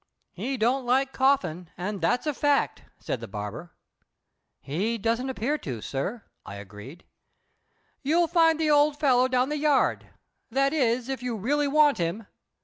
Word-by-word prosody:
"He 270 +1 -3
don't 250 +4 +1
like 265 +2 +1
Coffin, 180 - +1
and 195 +2 -4
that's 245 - +1
a 300 - 0
fact," 285 +1 0
said - - -4
the - - -8
barber. 105 - -7 0.9
"He 200 +11 -2
don't 230 +4 -1
appear 265 +4 -1
to, 125 -5 -5
sir," 165 - -4 0.2
I 100 - -9
agreed. 105 - -11 1.0
"You'll 325 +5 +2
find 325 -2 +3
the 310 -1 +2
old 290 0 +4
fellow 255 -4 +4
down 255 +1 +1
the 300 - -2
yard. 295 -2 +1 0.4
That 275 +4 +1
is, 250 -4 +1
if 265 -2 -4
you 250 -2 -3
really 285 +8 0
want 290 -4 +4
him." 175 +6 -2
250 Hz, 155 wpm, -26 LUFS, 185-285 Hz, 1.0 s, old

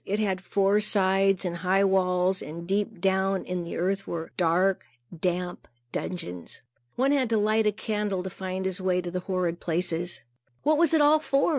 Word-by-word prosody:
It 205 - -2
had 195 -3 -1
four 195 +2 +2
sides 195 -2 +2
and 175 -1 -2
high 185 +3 +2
walls, 185 -1 +2
and 170 +2 -7
deep 205 +1 -1
down 190 +1 +1
in 180 -1 -3
the 170 - -6
earth 195 +3 -1
were 165 -1 -5
dark, 180 +2 +2 0.3
damp 180 +1 -3 0.2
dungeons. 90 - -6 0.3
One 265 +3 +2
had 265 -5 +2
to 225 - +2
light 215 +1 +2
a - - +4
candle 210 -3 -2
to 190 - -5
find 190 0 -4
his 190 0 -2
way 180 -1 +1
to 175 -1 -6
the 180 - -2
horrid 180 -2 -2
places. 175 -4 -2 0.4
What 305 0 +3
was 330 -1 +4
it 310 - +4
all 300 +1 +5
for? 275 -1 +1
190 Hz, 185 wpm, -27 LUFS, 180-205 Hz, 0.4 s, all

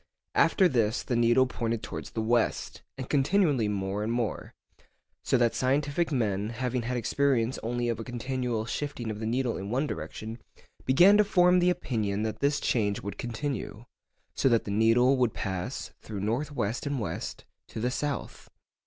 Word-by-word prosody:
After 190 - +4
this 115 -6 +1
the 125 - -1
needle 120 +2 +4
pointed 115 -3 -3
towards - - -6
the 110 - -3
west, 120 +1 0 0.2
and 130 -1 -5
continually 145 - +2
more 100 0 -2
and 110 +2 -1
more, 120 -2 -3 0.7
so - - +2
that 120 -1 +2
scientific 145 +5 0
men, 105 -6 0
having 125 +1 -2
had 125 +2 -2
experience 125 0 +1
only 120 +1 -1
of 115 -2 -1
a - - -4
continual 125 -1 -2
shifting 120 -2 -4
of 105 - -6
the 110 - -3
needle 120 0 0
in 100 +1 -5
one 130 +6 0
direction, 115 -5 -6 0.5
began 180 +10 +6
to 210 - +6
form 180 -3 +4
the 180 0 +4
opinion 110 - -1
that 110 -1 -3
this 140 +1 +2
change 105 -4 0
would 100 - -6
continue, 120 -2 -4 0.5
so 135 - +2
that 115 -2 +3
the 100 - -5
needle 115 +5 +4
would 125 -3 +1
pass, 95 -3 -4
through 105 -3 -6
north 120 +9 -1
west 120 0 -2
and 140 -2 -1
west, 105 - -5 0.2
to - - -7
the 125 +3 0
south. 145 +1 -4
120 Hz, 175 wpm, -28 LUFS, 110-135 Hz, 0.7 s, began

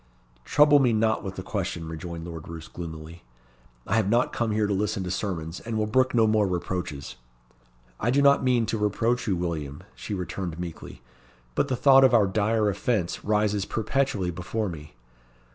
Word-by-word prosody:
"Trouble 145 -1 +5
me 125 -4 +3
not 110 -1 +1
with 95 -1 -5
the 95 - -6
question," 95 -5 -3
rejoined 80 +1 -6
Lord 80 -3 -8
Roos 80 -1 -8
gloomily; 80 0 -8 0.6
"I - - +1
have 105 -3 +1
not 120 +3 +2
come 120 -1 -1
here 105 0 +1
to 100 - 0
listen 105 0 -1
to 90 - -4
sermons, 90 -3 -3
and 115 -1 -4
will 110 - +1
brook 130 +4 +2
no 115 -2 +5
more 110 -2 +3
reproaches." 85 -7 -4 0.8
"I 115 - 0
do 135 +3 +3
not 140 -1 +5
mean 125 -3 +2
to 110 - -2
reproach 115 +4 0
you, 95 - +2
William," 80 -5 -4
she 105 - -5
returned 90 -2 -4
meekly; 85 -7 -8 0.5
"but 140 - +1
the 130 - 0
thought 135 +2 +6
of 130 -2 +6
our 110 -3 +5
dire 105 +2 +1
offence 100 -2 -1
rises 105 -1 +1
perpetually 110 -5 -1
before 95 +5 -3
me. 75 -3 -10
100 Hz, 180 wpm, -26 LUFS, 85-115 Hz, 0.8 s, thought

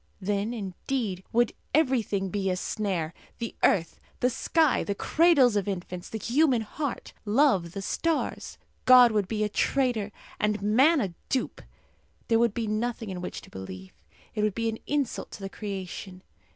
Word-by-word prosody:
Then, 205 +2 -1
indeed, 205 -1 -3
would 240 0 +2 0.2
everything 235 -10 +1
be 195 -1 -1
a 185 - +1
snare 180 -4 -2 0.2
the 230 -1 -4
earth, 170 -5 +2 0.2
the 250 - +2
sky, 315 +3 +2
the 200 - -2
cradles 290 - +4
of 205 -1 0
infants, 180 -2 -5
the 225 - -4
human 250 +1 +2
heart, 280 +5 -5
love, 205 - +2
the 195 -1 -5
stars. 330 - -2 0.3
God 250 -2 +8
would 210 -3 +1
be 215 0 -1
a - - +2
traitor 230 -2 0 0.3
and 210 0 +1
man 260 - +4
a 190 -5 -2 0.2
dupe. 260 - -1 0.7
There 225 -1 +4
would 235 -3 +2
be 235 - -1
nothing 220 0 -2
in 180 -1 -5
which 180 - -5
to - - -16
believe. 95 0 -8 0.4
It 210 - -1
would 210 -2 +1
be 230 -1 0
an 225 - -5
insult 285 -4 -1
to - - -8
the 195 -1 -5
creation. 190 -2 -6
215 Hz, 165 wpm, -27 LUFS, 195-245 Hz, 0.7 s, God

